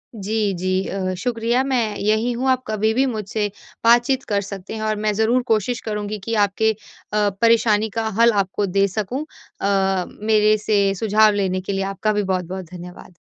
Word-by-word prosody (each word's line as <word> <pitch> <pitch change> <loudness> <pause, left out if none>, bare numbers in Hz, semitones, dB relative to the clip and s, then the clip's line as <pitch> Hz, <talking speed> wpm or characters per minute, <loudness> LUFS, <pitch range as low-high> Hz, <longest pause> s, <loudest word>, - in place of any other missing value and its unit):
जी, 210 0 -1
जी 185 +1 -1
अ, 185 -1 -2
शुक्रिया 235 +3 0
मैं 240 -6 0
यहीं 220 +3 +1
हूँ 260 +1 0
आप 255 0 0
कभी 215 0 0
भी 260 +4 +2
मुझसे 215 -3 -2 0.4
बातचीत 240 +3 +4
कर 200 -1 +1
सकते 200 0 -8
हैं 220 - -5
और 215 0 0
मैं 210 - +2
ज़रूर 220 +4 +2
कोशिश 220 +3 +1
करुँगी 210 -1 -4
कि 230 - -3
आपके 220 +3 +1 0.4
अ, 210 -1 +2
परेशानी 225 -2 +3
का 225 +1 -2
हल 235 0 +6
आपको 195 +2 -3
दे 195 +1 +2
सकूँ। 215 +9 -3 0.4
अ, 195 -2 +1 0.2
मेरे 215 0 +3
से 200 -2 +2
सुझाव 215 +1 +3
लेने 190 -2 -1
के 195 +2 -4
लिए 195 - -1
आपका 195 +2 -1
भी 210 0 0
बहुत-बहुत 185 0 -3
धन्यवाद। 180 0 -11
210 Hz, 180 wpm, -21 LUFS, 195-225 Hz, 0.4 s, हल